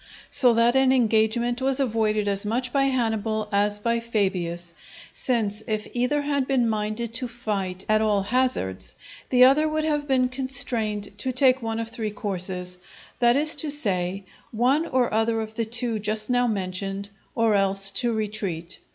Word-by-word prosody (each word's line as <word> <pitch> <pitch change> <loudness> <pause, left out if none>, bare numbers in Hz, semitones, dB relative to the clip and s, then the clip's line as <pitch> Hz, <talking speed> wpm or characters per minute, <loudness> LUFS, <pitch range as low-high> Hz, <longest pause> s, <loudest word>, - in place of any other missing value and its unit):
So 245 -3 +5
that 235 +2 +3
an 265 -1 +4
engagement 235 0 +1
was 265 +1 +2
avoided 215 -5 0
as 200 0 0
much 245 +4 -2
by 275 -1 +3
Hannibal 220 -4 -1
as 205 +1 +2
by 235 +2 0
Fabius, 185 -7 -2 0.4
since 220 -4 0
if 215 -1 -2
either 250 +4 0
had 285 -2 -1
been 255 -4 +2
minded 215 +1 -2
to 250 +2 -1
fight 200 -6 -4
at 215 0 +3
all 210 -2 +1
hazards 240 - 0 0.3
the 250 -1 +5
other 290 +4 +5
would 310 0 -1
have 295 -2 -1
been 260 -2 +2
constrained 235 -6 -1
to 260 +5 -1
take 255 0 +3
one 225 0 -3
of 225 0 -3
three 225 -1 -3
courses, 180 -3 -5 0.4
that 240 0 +4
is 305 +3 +1
to 310 - -2
say, 195 -9 -1 0.3
one 260 +8 +1
or 250 -3 0
other 225 +1 +1
of 220 0 -5
the 230 0 -1
two 235 0 -1
just 215 +2 0
now 245 0 +2
mentioned, 195 -1 -3 0.3
or 230 -2 +2
else 195 0 +3
to 240 +4 0
retreat. 200 -6 -3
225 Hz, 170 wpm, -24 LUFS, 205-250 Hz, 0.4 s, So